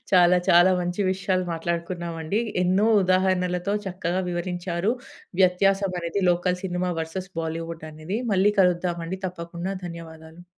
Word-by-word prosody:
చాలా, 180 0 +6
చాలా 175 +2 +7
మంచి 175 +2 -2
విషయాలు 185 -1 -1
మాట్లాడుకున్నామండి. 170 +1 -3 0.2
ఎన్నో 190 +4 +3 0.2
ఉదాహరణలతో 185 0 +1
చక్కగా 180 0 -2
వివరించారు. 175 +2 -2 0.5
వ్యత్యాసం 195 +1 +3
అనేది 170 +4 -2
లోకల్ 180 +1 0
సినిమా 180 -1 -1
వెర్సస్ 180 +4 -5
బాలీవుడ్ 165 0 -5
అనేది 155 +7 -4
మళ్ళీ 195 +2 +4
కలుద్దామండి. 175 0 0
తప్పకుండా 175 +1 -5
ధన్యవాదాలు. 165 0 -10
180 Hz, 115 wpm, -25 LUFS, 170-185 Hz, 0.5 s, చాలా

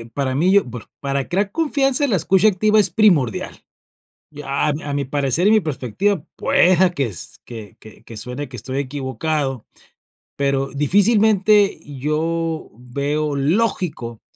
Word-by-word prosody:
eh, - - -12
para 135 -2 -1
mí, 175 +6 +3
yo 200 0 +5
bueno, 120 -1 -9
para 140 -1 -2
crear 195 +3 0
confianza 285 -1 +1
la 235 - 0
escucha 185 +4 +3
activa 215 +2 +2
es 200 -3 +3
primordial. 170 - +1 0.7
Ya 145 -1 -2
a 150 - +1
mi 150 - -6
a 145 - -4
mi 140 -1 -1
parecer 140 +6 0
y - - +5
mi 220 -1 +4
perspectiva 155 - -1
pueda 185 +1 +3
que 140 -8 -2 0.4
que 110 -5 -10 0.3
que 115 - -10
suene 125 +5 -5
que 125 - -9
estoy 130 +5 -4
equivocado, 135 -1 -3 0.7
pero 140 -1 0
difícilmente 205 - +3 0.2
yo 160 +3 -2
veo 140 +5 -3
lógico 150 - -1
150 Hz, 145 wpm, -20 LUFS, 135-195 Hz, 0.7 s, yo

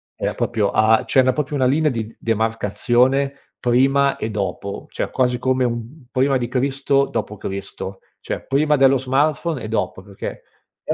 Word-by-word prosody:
Era - - -2
proprio 105 -3 0
a 110 +1 +4
cioè 130 - +4
na 130 0 +3
proprio 150 0 -2
una 130 -2 +2
linea 150 +3 +2
di 115 -2 -5
demarcazione, 120 +5 +1 0.3
prima 135 +3 +3
e 110 - -3
dopo, 100 -1 -4
cioè - - -3
quasi 125 -1 +1
come 130 +1 +1
un 120 +4 -5
prima 135 +1 +2
di 120 -1 -2
Cristo, 135 +2 +1
dopo 105 - -3
Cristo; 95 0 -6 0.2
cioè - - -4
prima 150 +3 +3
dello 135 0 +5
smartphone 140 +3 0
e - - -4
dopo, 110 -3 -2
perché, 100 0 -7 0.4
è - - -1
130 Hz, 165 wpm, -21 LUFS, 110-135 Hz, 0.4 s, dello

